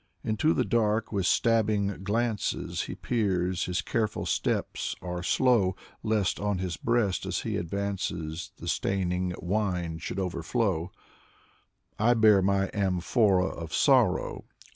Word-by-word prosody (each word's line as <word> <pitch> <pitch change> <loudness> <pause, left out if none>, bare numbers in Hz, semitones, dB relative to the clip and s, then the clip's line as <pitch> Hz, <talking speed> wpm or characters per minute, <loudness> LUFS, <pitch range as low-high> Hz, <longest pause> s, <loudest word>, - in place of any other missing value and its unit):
Into 110 +9 +1
the - - +1
dark 110 -1 +1
with 95 -4 0
stabbing 105 -4 +1
glances 110 +2 -1
He - - -6
peers, 95 -6 0
his 90 0 -2
careful 110 0 -1
steps - - -1
are 90 -1 -5
slow, 100 -2 +2 0.3
Lest 110 -4 0
on 105 -1 0
his 90 -2 -3
breast 115 -4 0
as - - -1
he - - -3
advances 90 -3 -3
The - - -9
staining 90 -2 -1
wine 90 -4 -1
should 90 - -5
overflow, 90 0 -1 1.1
I 120 +3 +4
bear 110 -3 +6
my 95 0 +1
amphora 95 0 +2
of 85 -3 -5
sorrow. - - +2
100 Hz, 125 wpm, -28 LUFS, 90-110 Hz, 1.1 s, bear